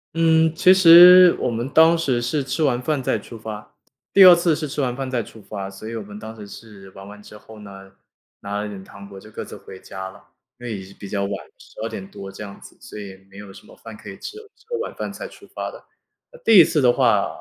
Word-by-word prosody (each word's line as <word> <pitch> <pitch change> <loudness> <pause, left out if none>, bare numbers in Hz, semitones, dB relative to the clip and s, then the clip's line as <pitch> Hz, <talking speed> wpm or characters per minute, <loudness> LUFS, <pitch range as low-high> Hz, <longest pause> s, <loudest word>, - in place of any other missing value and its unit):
嗯， 160 -1 +3
其 180 +2 +4
实 180 0 +8
我 - - -1
们 120 +2 -4
当 160 +3 +4
时 130 -7 -1
是 140 +4 -2
吃 135 +4 -4
完 130 -5 +1
饭 145 +2 -2
再 125 - -1
出 110 +3 -12
发 105 -1 -9 0.4
第 195 - +7
2 180 -1 +9
次 170 -2 +1
是 155 0 -5
吃 145 - -7
完 125 -3 -1
饭 135 -1 -5
再 120 -3 -2
出 110 - -15
发， 100 -1 -8
所 100 +3 -11
以 115 - -7
我 110 - -6
们 105 +1 -11
当 110 +1 -10
时 105 -2 -11
是 100 -3 -14
玩 95 +1 -13
完 105 0 -13
之 105 - -14
后 110 +1 -15
呢， 95 -1 -13 0.5
拿 100 +1 -5
了 105 - -4
一 - - -8
点 95 -2 -10
糖 100 +1 -14
果 95 -1 -11
就 110 +2 -16
各 - - -7
自 - - -11
回 95 - -13
家 95 0 -9
了， - - -18 0.4
因 120 - -9
为 110 -3 -5
也 95 - -9
是 95 - -15
比 100 -1 -11
较 100 -1 -2
晚， 100 - -4 0.3
12 - - -9
点 190 - -8
多 95 0 -10
这 105 - -10
样 100 -1 -11
子， - - -16
所 105 - -11
以 95 -2 -10
没 100 - -15
有 100 -1 -11
什 95 - -16
么 - - -17
饭 110 -1 -12
可 - - -15
以 - - -12
吃 425 - -9
了， 440 - -11
吃 - - -29
完 465 +1 -4
晚 - - -20
饭 - - -6
才 - - -8
出 - - -17
发 - - -5
的。 - - -14 0.6
第 220 -4 +7
1 - - +10
次 155 - -1
的 125 -3 +3
话， 115 -7 +2
115 Hz, 285 characters per minute, -21 LUFS, 100-155 Hz, 0.6 s, 1